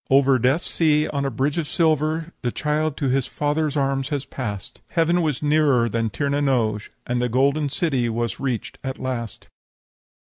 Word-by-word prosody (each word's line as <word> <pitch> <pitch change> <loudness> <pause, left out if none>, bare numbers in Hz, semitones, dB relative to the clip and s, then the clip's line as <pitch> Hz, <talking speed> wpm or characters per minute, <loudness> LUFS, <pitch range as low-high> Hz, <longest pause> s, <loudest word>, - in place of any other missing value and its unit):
"Over 135 -1 +5
Death 130 +8 +2
Sea 155 -2 +2
on 140 -1 -2
a - - +1
bridge 140 +4 -1
of 155 - -2
silver 160 +1 +1
The 120 - -1
child 150 +1 -1
to 140 - 0
his 135 0 +1
Father's 150 0 -1
arms 135 -1 0
had 145 -2 -4
passed! 105 -7 -5
Heaven 170 +1 +2
was 150 -4 -1
nearer 145 -5 +3
than 115 0 -1
Tir 140 +6 -2
na 140 +1 +1
n'oge, 115 -7 0 0.2
And 125 0 -1
the 125 - 0
golden 140 +4 +2
city 135 -5 0
was 115 -2 -2
reached 130 -5 -3
at 130 0 -4
last." 120 -5 -5
140 Hz, 180 wpm, -23 LUFS, 125-150 Hz, 0.2 s, Over